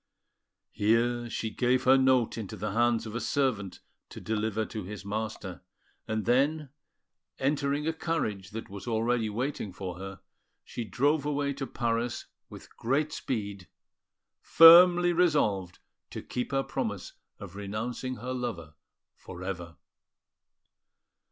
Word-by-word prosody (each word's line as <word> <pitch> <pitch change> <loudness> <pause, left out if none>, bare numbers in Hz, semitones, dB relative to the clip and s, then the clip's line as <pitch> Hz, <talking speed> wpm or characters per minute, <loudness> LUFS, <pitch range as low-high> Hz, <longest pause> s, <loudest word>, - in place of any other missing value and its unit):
Here 120 +3 +1
she 110 -1 -3
gave 125 +3 +1
her 130 +1 +6
note 130 -3 +3
into 110 -5 -6
the 105 +3 -3
hands 120 0 +2
of 110 - -7
a 120 - -3
servant 120 -9 -1 0.3
to - - -9
deliver 110 0 -1
to 110 -2 -6
his 100 +1 -8
master; 105 -3 -5 0.5
and 110 0 -2
then, 140 +5 +2 0.7
entering 140 +1 0
a 160 - 0
carriage 110 - -2
that 110 +2 -7
was 100 +3 -9
already 115 0 0
waiting 120 -1 -3
for 90 -1 -7
her, 95 0 -8 0.4
she 120 - -6
drove 140 +8 +1
away 145 -1 -1
to 135 -1 -5
Paris 120 0 -2 0.2
with - - -13
great 140 +6 0
speed, 100 -6 -4 0.7
firmly 175 +1 +8
resolved 140 - +1 0.3
to - - -7
keep 125 - -4
her 135 0 +1
promise 110 -10 -4 0.2
of 90 - -10
renouncing 115 +6 -4
her 125 +1 -5
lover 115 -12 -5 0.4
for 90 0 -10
ever. 85 -3 -5
115 Hz, 130 wpm, -29 LUFS, 105-135 Hz, 0.7 s, firmly